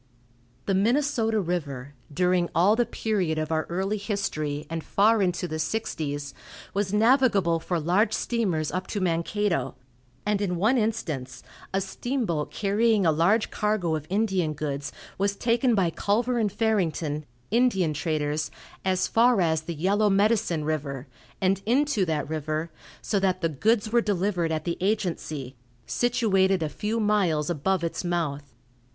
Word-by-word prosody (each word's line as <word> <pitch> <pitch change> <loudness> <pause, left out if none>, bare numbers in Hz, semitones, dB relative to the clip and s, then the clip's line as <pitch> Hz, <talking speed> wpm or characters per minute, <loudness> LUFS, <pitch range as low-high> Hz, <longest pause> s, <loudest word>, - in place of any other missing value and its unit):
The 195 - +1
Minnesota 225 +1 +2
river, 145 -7 -3 0.2
during 180 +2 +1
all 185 +6 +5
the 240 -1 +1
period 195 -9 -1
of 155 0 -2
our 155 -1 0
early 190 +4 -1
history, 155 -8 -2
and 165 0 -4
far 215 +2 +3
into 180 -1 0
the 155 -1 -4
sixties, 145 -8 -3 0.4
was 200 -1 -1
navigable 210 -6 +3
for 175 +1 -2
large 185 +7 +2
steamers 195 -10 -1
up 185 +1 -3
to 205 - -3
Mankato, 185 +2 0 0.5
and 210 -1 +1
in 185 -3 0
one 220 +9 +3
instance, 160 - -3 0.3
a 195 - +1
steamboat 195 - -2
carrying 210 0 +2
a 160 - +5
large 175 +8 +2
cargo 210 -6 0
of 155 -1 -5
Indian 190 -5 +1
goods 145 -1 -4 0.3
was 200 0 +1
taken 235 +3 +2
by 180 -5 +2
Culver 235 +7 0
and 210 -3 +1
Farrington, 170 -9 0 0.3
Indian 210 -9 +2
traders, 150 -1 -1 0.3
as 185 -1 +1
far 235 -1 +4
as 160 -3 +2
the 165 +1 -6
Yellow 200 +6 +2
Medicine 200 -5 +2
river, 145 -3 -3 0.3
and 195 0 +1
into 255 -4 +2
that 155 -4 -1
river, 155 +1 -3 0.3
so 205 - 0
that 185 -1 0
the 165 - +1
goods 215 - +1
were 235 0 +4
delivered 185 -5 0
at 155 -1 -1
the 170 0 -2
agency, 165 - -2 0.3
situated 195 -7 +2
a 155 - -1
few 215 +7 -2
miles 185 -8 +1
above 175 +3 0
its 170 - -2
mouth. 145 -7 -2
185 Hz, 150 wpm, -26 LUFS, 160-215 Hz, 0.5 s, all